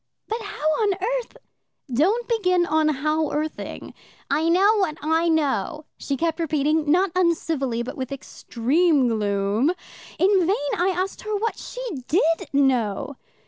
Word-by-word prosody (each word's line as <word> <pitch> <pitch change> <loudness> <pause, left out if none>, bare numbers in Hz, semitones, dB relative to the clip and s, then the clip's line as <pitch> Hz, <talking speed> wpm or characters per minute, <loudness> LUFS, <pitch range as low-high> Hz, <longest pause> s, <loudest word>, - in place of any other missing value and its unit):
"But 450 +2 -3
how 405 -7 -4
on 410 -2 +3
earth 480 +6 -3 0.3
" 260 - -15
"Don't 400 - +2
begin 365 -7 +2
how 310 -1 +1
on - - -6
earthing. 310 +1 -5 0.4
'I 320 +2 +2
know 395 +5 +4
what 345 -6 0
I 325 +2 +1
know,' 310 0 0
she 275 - -3
kept 330 +1 -1
repeating, 310 -1 +1
not 365 +3 +3
uncivilly, 320 -9 0
but 250 - -6
with 260 0 -4
extreme 275 +2 +1
gloom. 205 +3 +1 0.5
In 390 +1 +4
vain 290 -7 0
I 355 +2 +1
asked 375 +1 -2
her 430 -1 -3
what 445 +2 -2
she - - -6 0.2
did 330 0 +1
know. 265 -3 +1
320 Hz, 145 wpm, -23 LUFS, 280-375 Hz, 0.5 s, know